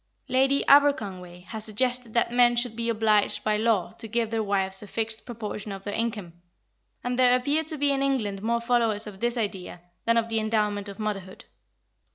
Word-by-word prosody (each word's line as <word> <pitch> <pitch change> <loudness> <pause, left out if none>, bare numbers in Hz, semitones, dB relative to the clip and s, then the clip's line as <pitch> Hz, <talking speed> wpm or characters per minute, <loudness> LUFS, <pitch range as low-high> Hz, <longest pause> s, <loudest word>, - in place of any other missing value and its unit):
Lady 270 +2 +2
Aberconway 195 -11 +3
has 220 +3 -7
suggested 245 +2 -1
that 235 - +2
men 240 0 +5
should 240 -1 -1
be 235 0 -1
obliged 215 -2 +2
by 215 -1 +1
law 215 -4 +1
to 225 - -7
give 230 0 -1
their 225 -1 0
wives 195 -2 -1
a 210 - -10
fixed 225 +2 -4
proportion 215 -3 -6
of 195 0 -7
their 205 - -4
incomes, 210 -7 -3 0.7
and 245 +1 -2
there 250 -1 +6
appear 285 +5 0
to 315 0 -7
be 285 0 +2
in 275 -1 0
England 225 -8 -1
more 235 +2 0
followers 230 -3 +1
of 205 -3 -9
this 240 +2 -1
idea 195 -5 -4 0.3
than 230 0 +3
of 230 0 +2
the 225 -1 0
endowment 210 -2 0
of 200 - -9
motherhood. 195 -3 -5
225 Hz, 195 wpm, -26 LUFS, 205-245 Hz, 0.7 s, there